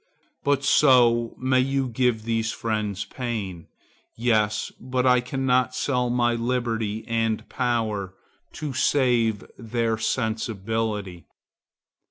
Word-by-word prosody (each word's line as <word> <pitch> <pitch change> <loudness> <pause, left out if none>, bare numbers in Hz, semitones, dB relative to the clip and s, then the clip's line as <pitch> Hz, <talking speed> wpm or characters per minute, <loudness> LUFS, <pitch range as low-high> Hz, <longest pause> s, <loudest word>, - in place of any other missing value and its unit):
'—But 140 -1 +1
so 120 -5 +4
may 130 0 +2
you 135 +1 +1
give 120 -2 0
these 115 -1 -1
friends 105 -3 -2
pain. 100 -7 -5 0.5
Yes, 110 -3 +1
but 125 +1 -1
I 125 -1 +5
cannot 130 -1 0
sell 125 -3 0
my 120 -1 +2
liberty 115 -3 -2
and 115 -1 0
my - - -20
power, 110 -6 -1 0.4
to 150 -3 -5
save 120 -5 +2 0.2
their 115 -1 -1
sensibility. 110 - -2
115 Hz, 110 wpm, -24 LUFS, 110-125 Hz, 0.5 s, I